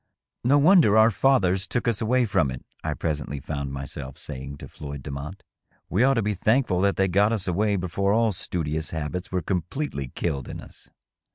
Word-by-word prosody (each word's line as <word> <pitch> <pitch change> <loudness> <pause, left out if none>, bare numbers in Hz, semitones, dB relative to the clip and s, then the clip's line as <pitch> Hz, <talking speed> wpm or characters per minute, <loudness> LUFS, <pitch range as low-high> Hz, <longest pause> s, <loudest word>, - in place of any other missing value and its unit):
" - - -65
No 135 +4 +4
wonder 145 - +6
our 110 +1 +6
fathers 95 -4 +2
took 120 0 -2
us 115 -1 +1
away 125 +3 +2
from 80 -9 +1
it,^^ 65 0 -7 0.2
I - - -2
presently 75 -3 -3
found 70 0 -4
myself 70 -1 -7
saying 70 +2 -7
to - - -9
Floyd 70 -2 -8
Demotte; 70 +7 -6 0.3
" - - -39
we 105 +7 +3
ought 135 +1 +4
to 115 - +1
be 105 +1 0
thankful 105 -1 +2
that 100 0 +2
they 95 - +2
got 100 +4 +3
us 105 -5 -1
away 100 +4 +1
before 95 +2 0
all 115 +1 +3
studious 80 -4 -3
habits 80 +3 -4
were 90 -2 -1
completely 90 - -2
killed 70 -1 -3
in - - -6
us." - - -12
95 Hz, 200 wpm, -25 LUFS, 75-110 Hz, 0.3 s, wonder